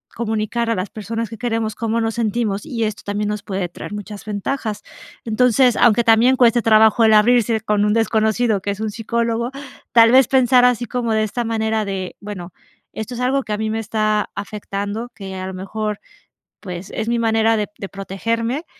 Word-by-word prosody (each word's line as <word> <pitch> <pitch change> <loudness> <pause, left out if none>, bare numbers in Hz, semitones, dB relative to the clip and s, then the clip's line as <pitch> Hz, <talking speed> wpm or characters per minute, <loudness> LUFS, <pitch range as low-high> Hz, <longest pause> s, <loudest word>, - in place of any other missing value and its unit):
comunicar 225 +1 -2
a 230 - +1
las 185 0 -4
personas 225 +2 -4
que 225 - -8
queremos, 225 -2 -1
cómo 230 0 -1
nos 225 0 -1
sentimos, 220 -2 -1
y 235 -6 -2
esto 215 -1 -4
también 205 +1 -2
nos 210 0 -3
puede 190 -3 -3
traer 205 - -9
muchas 210 0 -8
ventajas. 215 +1 -3 0.4
Entonces, 245 +2 +3
aunque 235 +1 +4
también 230 +3 +5
cueste 240 -1 +4
trabajo 220 +1 +5
el 220 - +5
abrirse 225 0 +4
con 210 -1 +1
un 210 - +2
desconocido 220 -1 +1
que 200 - -4
es 200 - -6
un 220 - -2
psicólogo, 230 +2 -1 0.4
tal 230 -1 +6
vez, 265 0 +6
pensar 255 -1 +4
así 245 -1 +2
como 235 -1 -2
de 220 0 +2
esta 235 +3 -2
manera 220 -1 0
de: 190 -2 -4
"Bueno, 185 -4 -8 0.4
esto 220 +3 -6
es 245 - -5
algo 265 +2 +1
que 215 - -4
a 210 - -1
mí 220 0 -1
me 225 - -2
está 215 -1 0
afectando, 205 +2 -5
que 190 -2 -8
a 185 0 -5
lo 190 - -6
mejor, 210 +2 -4 0.6
pues, 180 -1 -7
es 225 +1 -2
mi 235 0 +1
manera 225 0 +2
de 210 - -1
de 195 - -7
protegerme, 230 - -3
220 Hz, 195 wpm, -20 LUFS, 210-235 Hz, 0.6 s, tal